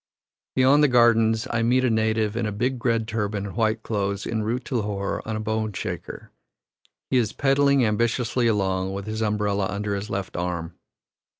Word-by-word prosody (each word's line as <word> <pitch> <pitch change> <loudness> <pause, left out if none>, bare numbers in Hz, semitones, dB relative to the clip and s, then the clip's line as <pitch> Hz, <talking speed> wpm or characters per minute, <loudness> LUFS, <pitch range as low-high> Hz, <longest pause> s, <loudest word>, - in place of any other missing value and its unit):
Beyond 130 +3 +5
the - - +6
gardens, 115 -3 +4
I 115 - 0
meet 125 +3 +3
a - - +3
native 110 -1 +1
in 120 -2 -1
a - - -2
big 125 +4 -2
red 115 -2 +1
turban 105 -2 -2
and 100 - -7
white 110 -1 0
clothes, 100 -2 -2
en 110 -1 -2
route 120 +4 -2
to 130 - -2
Lahore 100 -2 -2
on 110 - -2
a - - -2
bone 110 -1 -2
shaker. - - -6 0.8
He 130 - +4
is 115 -4 +1
pedalling 140 -1 +3
ambitiously 120 +2 +1
along, 95 -3 0
with 100 0 -5
his 110 +1 -4
umbrella 105 -2 0
under 100 0 -2
his 100 +1 -4
left 100 -1 -4
arm. 85 -2 -3
110 Hz, 185 wpm, -24 LUFS, 100-120 Hz, 0.8 s, the